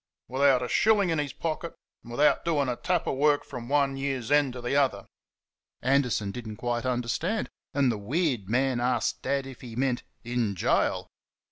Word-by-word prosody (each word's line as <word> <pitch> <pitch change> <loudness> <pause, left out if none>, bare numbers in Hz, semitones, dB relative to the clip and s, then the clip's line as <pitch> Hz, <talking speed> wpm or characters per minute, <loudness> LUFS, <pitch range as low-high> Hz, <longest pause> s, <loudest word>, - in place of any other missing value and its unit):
"without 130 0 +3
a - - -2
shilling 205 - +3
in 160 - +1
his 145 -2 -2
pocket 165 +1 -4 0.3
and - - -14
without 145 +4 +3
doing 150 -5 +1
a 125 - -1
tap 175 +6 0
of - - -1
work 145 +1 +3
from 125 -3 -7
one 140 -1 +2
year's 135 -3 -3
end 145 -2 +4
to 125 - -7
the 120 +3 -2
other?" 135 -8 +2 0.8
Anderson 125 -6 +2
did 120 +1 -7
n't 105 -1 -7
quite 120 +1 -2
understand, 125 - -1 0.2
and 140 -3 +3
the 110 - -3
weird 125 - -1
man 130 +1 +1
asked 120 -1 0
Dad 140 0 -1
if 135 -2 -10
he 120 -3 -9
meant 125 -1 0 0.2
"in 120 -4 -1
gaol." 90 - +1
130 Hz, 190 wpm, -27 LUFS, 120-145 Hz, 0.8 s, end